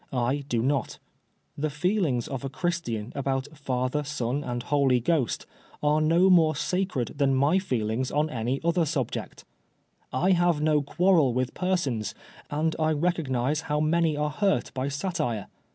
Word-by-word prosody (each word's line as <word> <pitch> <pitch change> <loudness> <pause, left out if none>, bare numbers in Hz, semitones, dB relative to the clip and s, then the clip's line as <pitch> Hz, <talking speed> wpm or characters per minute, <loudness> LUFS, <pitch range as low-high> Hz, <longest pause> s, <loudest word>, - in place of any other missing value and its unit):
I 130 +3 0
do 115 -2 +1
not. 135 -1 0 0.6
The 155 +2 -1
feelings 150 - 0
of 135 -2 -5
a 135 - -3
Christian 140 - -3
about 135 -1 -1
Father, 130 0 -1
Son 140 -1 -2
and 120 -1 -3
Holy 135 -2 +2
Ghost, 135 -1 0 0.4
are 150 +1 +3
no 165 +4 +4
more 160 -4 +5
sacred 180 - -1
than 135 -1 +3
my 145 +8 +3
feelings 125 - -1
on 150 +2 +1
any 125 -1 -2
other 170 -1 +2
subject 140 -6 -3 0.7
I 175 +9 +2
have 175 -3 +3
no 150 -1 +3
quarrel 155 -3 +3
with 130 0 -1
persons, 145 - -1 0.3
and 155 +2 0
I 155 0 +2
recognise 150 -4 0
how 150 0 +1
many 160 0 +2
are 150 0 0
hurt 195 +5 0
by 130 +1 -2
satire. 140 - -2
145 Hz, 150 wpm, -27 LUFS, 130-165 Hz, 0.7 s, more